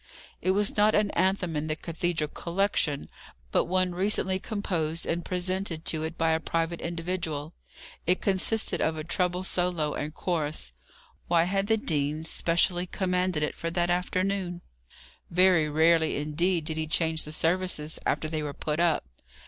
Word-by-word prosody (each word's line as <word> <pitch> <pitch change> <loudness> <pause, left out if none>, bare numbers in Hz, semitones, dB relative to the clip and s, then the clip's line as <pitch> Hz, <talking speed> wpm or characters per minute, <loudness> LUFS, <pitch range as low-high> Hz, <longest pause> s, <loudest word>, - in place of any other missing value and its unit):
It - - 0
was 205 0 +1
not 210 +1 +4
an 210 -1 +2
anthem 185 -2 +1
in 150 +1 -1
the 155 - -1
cathedral 165 -2 -2
collection, 170 -5 -1 0.4
but - - +3
one 185 0 +1
recently 190 0 +2
composed 170 -7 -2
and 170 +1 -1
presented 180 -2 -2
to 155 - +1
it 160 +1 -4
by 165 0 +2
a 160 - +2
private 165 +1 -2
individual. 165 -3 -3 0.5
It 180 +2 +3
consisted 200 +3 +2
of 160 0 +1
a 155 - -4
treble 180 +2 0
solo 175 -5 0
and 150 +1 -3
chorus. 155 - -2 0.5
Why 170 -1 +4
had 195 +3 0
the 220 0 +3
dean 155 -5 -1
specially 175 +2 +1
commanded 180 -4 0
it 150 - -1
for 165 - -3
that 175 +1 0
afternoon? 180 0 -1 0.7
Very 180 -3 +4
rarely 160 +1 +3
indeed 160 +3 0
did 160 0 -3
he 160 0 -1
change 160 0 +1
the 150 - -5
services 165 -1 0
after 155 - 0
they 155 0 -2
were 145 -1 -4
put 150 +2 -3
up. 170 -2 +2
170 Hz, 160 wpm, -28 LUFS, 155-185 Hz, 0.7 s, not